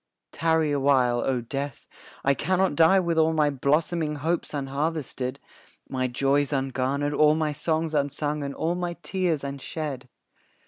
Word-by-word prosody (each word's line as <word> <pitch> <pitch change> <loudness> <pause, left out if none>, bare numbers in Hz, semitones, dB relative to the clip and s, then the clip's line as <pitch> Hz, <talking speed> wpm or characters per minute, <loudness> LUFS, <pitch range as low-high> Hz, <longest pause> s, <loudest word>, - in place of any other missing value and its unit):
Tarry 160 -2 +1
a 145 - +1
while, 130 -3 +3
O 125 0 0
Death, 135 +3 -5 0.4
I 140 - +5
cannot 185 +5 +1
die 165 +6 +5
With 170 -3 0
all 160 0 +3
my 150 -2 +2
blossoming 150 +3 0
hopes 165 +4 -1
unharvested, 140 -2 -3 0.5
My 130 -1 -1
joys 140 +3 +1
ungarnered, 135 +1 -1
all 150 +1 +5
my 155 -1 0
songs 160 +2 -1
unsung, 145 +1 -1
And 140 0 -4
all 165 +2 0
my 175 -1 -3
tears 180 -6 -1
unshed. 140 -1 -5
145 Hz, 145 wpm, -26 LUFS, 140-160 Hz, 0.5 s, I